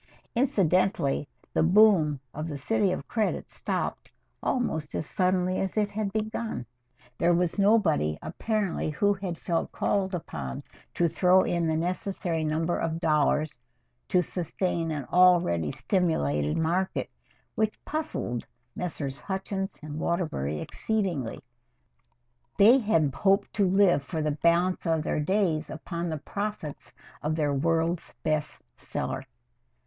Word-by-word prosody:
Incidentally 185 - +2 0.3
the - - +2
boom 175 -5 +5 0.2
in 155 +2 -3
"The 145 -3 -4
City 195 +6 +1
of 185 - -4
Credit" 220 -3 -1
stopped - - -3 0.3
almost 160 - -1
as - - -2
suddenly 185 -1 +1
as 195 +2 -2
it 210 -1 +1
had 210 -1 -2
begun. 215 - -3 0.5
There 170 0 +4
was 180 +2 0
nobody 185 - +3
apparently 210 -8 -2
who 205 +6 +2 0.2
felt 165 0 -2
called 190 -2 0
upon 70 - -5 0.3
to 170 - +3
throw 180 +3 +4
in 170 -1 0
the 160 0 +1
necessary 175 -1 -2
number 160 +2 0
of 165 0 -1
dollars 150 -2 +1 0.5
to 180 -1 +3
sustain 170 0 -2
an 150 -4 -3
already 175 - +5
over - - -2
stimulated 75 - +1
market, 175 +4 0 0.5
which 220 -1 0
puzzled 305 - -3 0.3
Messrs. 145 -6 -4
Hutchins 195 +2 -3
& - - -26
Waterbury 155 - -2
exceedingly. 185 - -2 1.1
They 230 +7 +7
had 165 - +2
hoped 195 +5 +2
to 200 -3 +2
live 190 -5 +4
for 160 +2 -3
the 150 - +1
balance 170 +4 +2
of 160 -2 +1
their - - -1
days 165 -1 +1
upon 170 +2 -4
the 160 - -2
profits 200 -2 -5 0.3
of 155 +1 -1
their 150 -3 +1
World's 165 +4 0
Best 155 -1 -1
Seller. - - -4
170 Hz, 130 wpm, -27 LUFS, 155-195 Hz, 1.1 s, They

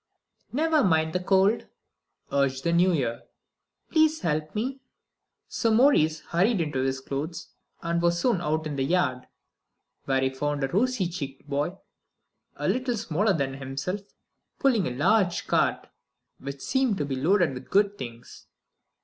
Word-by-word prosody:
"Never 310 +3 +2
mind 160 -4 +2
the 180 - +1
cold," 195 +4 +2 0.6
urged 135 -1 +1
the 170 - +1
New 180 +2 +4
Year; 120 -8 -1 0.7
"please 315 -1 +3
help 155 -2 -2
me." 260 +5 -2 0.7
So 230 - 0
Maurice 220 - +4
hurried 195 +5 +1
into 150 -5 -1
his 135 0 0
clothes, 140 +5 -5 0.3
and 170 0 0
was 170 0 +2
soon 230 -6 +1
out 155 -1 -1
in 150 -2 -4
the 135 - +1
yard. 135 -5 0 0.8
There 135 -1 +2
he 130 0 +1
found 145 +1 -2
a - - +2
rosy 220 - +1
cheeked 140 -5 -7
boy 145 +6 -2 0.8
a - - -3
little 250 -2 0
smaller 205 0 +1
than 140 -5 -1
himself, 140 +9 -4 0.6
pulling 240 - +2
a 125 0 -5
large 185 +4 +2
cart - - +1 0.5
which 140 0 -7
seemed 260 -6 +1
to 145 - -1
be 135 -1 -3
loaded 170 +2 +2
with 125 0 -9
good 200 +1 +3
things. 120 -1 -9
170 Hz, 150 wpm, -26 LUFS, 140-205 Hz, 0.8 s, New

